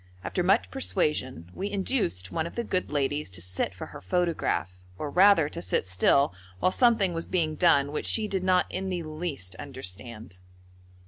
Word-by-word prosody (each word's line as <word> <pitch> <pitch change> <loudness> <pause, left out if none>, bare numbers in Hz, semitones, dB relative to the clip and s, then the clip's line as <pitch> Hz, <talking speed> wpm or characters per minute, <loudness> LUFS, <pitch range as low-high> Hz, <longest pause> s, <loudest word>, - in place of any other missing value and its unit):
After 90 - -1
much 95 +1 +2
persuasion 95 - -1
we 200 +2 -3
induced 195 - 0
one 160 0 -1
of - - -11
the 235 - -1
good 185 -4 -2
ladies 145 -1 -1
to 90 -1 -6
sit 90 +2 -2
for - - -6
her - - -9
photograph, 125 - -1 0.2
or 150 -2 -4
rather 185 -4 +6
to - - -6
sit 90 +2 -1
still 95 +6 +3 0.2
while 185 - +2
something 225 -6 +3
was 165 0 -4
being 160 -4 0
done 150 -4 +3
which 150 - -3
she 220 -2 +2
did 190 -3 -2
not 185 -1 +3
in 190 0 -3
the 175 -2 -2
least 155 - -4
understand. 110 -5 -6
150 Hz, 180 wpm, -27 LUFS, -, 0.2 s, rather